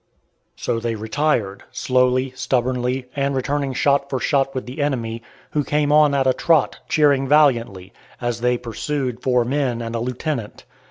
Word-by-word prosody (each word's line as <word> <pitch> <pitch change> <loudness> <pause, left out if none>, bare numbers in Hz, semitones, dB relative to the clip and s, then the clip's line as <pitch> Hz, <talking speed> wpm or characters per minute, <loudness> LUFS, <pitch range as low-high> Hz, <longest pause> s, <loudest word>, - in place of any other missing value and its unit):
So 115 - -2
they 115 0 -2
retired, 110 -2 -1
slowly, 125 0 +1
stubbornly, 125 0 -1
and 140 -1 0
returning 140 +1 -1
shot 140 +1 +2
for 130 - -1
shot 135 -1 +1
with 130 - -3
the 130 +5 -6
enemy, 115 -5 -2 0.3
who 150 - 0
came 145 +1 0
on 150 -1 +5
at 135 -1 +2
a 130 - +4
trot, 160 -2 +2
cheering 140 -3 +3
valiantly, 120 -10 +2 0.3
as 120 -1 -3
they 125 0 +2
pursued 125 +1 -3
four 125 -2 +2
men 130 -2 -1
and 115 -1 -5
a 115 - -1
lieutenant. 125 -1 -4
130 Hz, 160 wpm, -21 LUFS, 120-140 Hz, 0.3 s, on